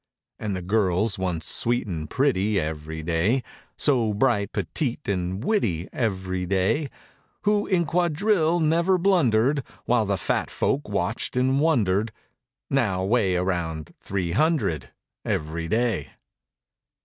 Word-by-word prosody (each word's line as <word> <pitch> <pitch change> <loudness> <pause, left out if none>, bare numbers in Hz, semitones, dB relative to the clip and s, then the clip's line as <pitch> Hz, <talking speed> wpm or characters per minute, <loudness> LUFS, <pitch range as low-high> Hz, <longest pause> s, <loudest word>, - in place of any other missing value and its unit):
93 - - -7
And 100 - -1
the 90 -1 -6
girls 100 0 +1
once 90 -4 -2
sweet 120 +1 +1
and 80 -6 -5
pretty 105 -7 +1
Every 80 0 -4
day; 85 +11 +1 0.3
So 120 -7 +2
bright, 105 -3 +1
petite 140 -2 -3
and 95 +1 -2
witty 95 - 0
Every 95 -5 -2
day; 100 - +1 0.5
Who 210 0 +2
in 180 -3 +2
quadrille 175 +1 +2
never 170 +4 +3
blundered, 140 - +3 0.2
While 115 -3 +2
the 100 -1 +1
fat - - -1
folk 140 -4 -1
watched 100 +5 -2
and 130 +2 +2
wondered. 110 - +2 0.6
Now 105 -9 +1
weigh 100 -2 +2
around 85 -4 -2
three 95 -4 -2
hundred 130 - +1 0.3
Every 80 +2 -2
day. 110 - 0
105 Hz, 125 wpm, -25 LUFS, 90-140 Hz, 0.6 s, never